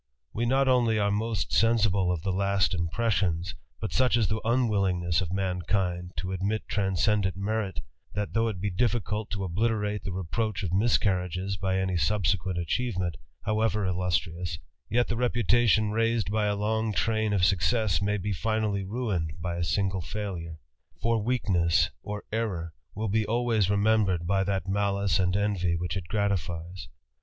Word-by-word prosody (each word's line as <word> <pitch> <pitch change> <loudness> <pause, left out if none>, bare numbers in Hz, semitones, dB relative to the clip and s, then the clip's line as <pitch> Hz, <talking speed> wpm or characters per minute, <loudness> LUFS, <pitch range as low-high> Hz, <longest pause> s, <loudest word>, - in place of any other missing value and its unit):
/ - - -51
We 120 +2 -1
not 135 +2 +3
only 120 -4 +3
are 100 -1 +2
most 105 -5 -1
sensible 105 -5 +3
of 85 -3 -2
the 95 - 0
last 100 +1 +1
impressions, 90 -1 0 0.2
/ 110 - -5
such 125 -1 +3
is 110 -6 +1
the 110 +1 -1
unwillingness 100 -8 +1
of 90 -3 -3
mankind 90 -1 -1
to 90 +3 -3
admit 100 +4 -2
transcend 95 0 +1
merit, 100 0 -2 0.3
that, 105 0 -2
though 115 0 +2
it 105 -5 -3
be 100 +2 -1
difficult 110 0 0
to 100 -1 -3
obliterate 105 +2 -1
the - - -4
repro{ 100 +4 -2
Of 90 -2 -2
miscarriages 95 -3 +1
by 95 0 -1
any 95 -1 0
subsequent 90 +2 +1
achievement, 90 -1 -1 0.3
howe 110 +1 0
illustrious, 90 -5 -1 0.3
yet 120 +3 +2
the 115 - -2
reputation 120 -3 +3
raised 115 -1 +1
by 105 -1 +1
a 105 - +1
long 110 +1 0
train 110 0 +1
success 95 +1 +2
may 105 +1 +1
be 100 +1 -2
finally 110 0 -1
ruined 95 -7 -2
by 85 0 -3
a 85 - -1
single 95 +4 0
failure; 90 -4 -5 0.4
for 115 -1 +1
we 125 +4 +1
ness 85 -4 +3
or 105 +4 -5
error 95 -8 -2 0.2
will 110 +2 -2
be 110 +2 +1
always 115 -2 +1
remembered 100 -4 +2
by 95 +2 +2
that 95 -1 -2
malice 100 -2 +1
a 90 -1 +2
envy 95 -4 0
which 85 +1 -3
it 95 -3 -4
gratifies. 90 -4 -2
100 Hz, 160 wpm, -28 LUFS, 90-110 Hz, 0.4 s, not